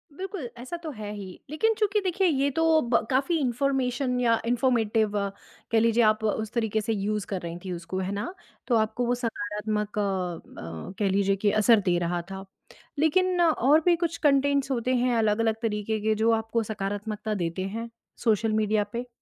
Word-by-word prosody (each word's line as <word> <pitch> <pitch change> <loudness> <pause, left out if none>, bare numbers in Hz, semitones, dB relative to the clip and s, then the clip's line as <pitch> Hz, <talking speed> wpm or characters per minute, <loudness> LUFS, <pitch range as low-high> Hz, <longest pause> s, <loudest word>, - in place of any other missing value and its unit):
बिल्कुल, 375 -6 -5
ऐसा 260 +8 -6
तो 315 - -4
है 210 -5 -6
ही। 195 -3 -8
लेकिन 445 +9 +2
चूँकि 420 0 +2
देखिए, 375 0 +1
ये 280 -2 +2
तो 325 +1 +3
ब 235 -1 +1
काफ़ी 275 +6 +2
इन्फ़ॉर्मेशन 255 0 0
या 230 -2 +3
इन्फ़ॉर्मेटिव 225 -4 +1 0.5
कह 225 - +4
लीजिए 230 +1 +3
आप 215 0 +3
उस 220 0 -1
तरीके 220 -2 0
से 225 +1 -1
यूज़ 210 0 -1
कर 190 -3 -3
रही 170 0 -5
थी 185 - -4
उसको, 175 +2 -4
है 190 +1 -2
ना? 205 - -3 0.3
तो 245 - +3
आपको 225 +2 +1
वो 245 +1 +1
सकारात्मक 210 -2 -3
अ - - +2
अ, 180 - -4
कह 200 -2 +2
लीजिए 195 0 +2
कि 200 +1 +1
असर 215 +1 +5
दे 175 -2 +3
रहा 175 0 -1
था। 195 0 -6 0.5
लेकिन 360 +4 +2
और 310 -3 +4
भी 350 -1 +5
कुछ 335 -1 -2
कंटेंट्स 280 -1 +2
होते 255 +1 0
हैं 245 0 +2
अलग-अलग 220 0 +2
तरीके 215 -1 -1
के 215 0 +1
जो 225 +2 +2
आपको 225 +1 0
सकारात्मकता 210 +1 -3
देते 170 +3 -2
हैं 230 +1 -4 0.3
सोशल 220 -1 +2
मीडिया 215 -1 +2
पे? 245 +1 -3
225 Hz, 185 wpm, -26 LUFS, 205-265 Hz, 0.5 s, असर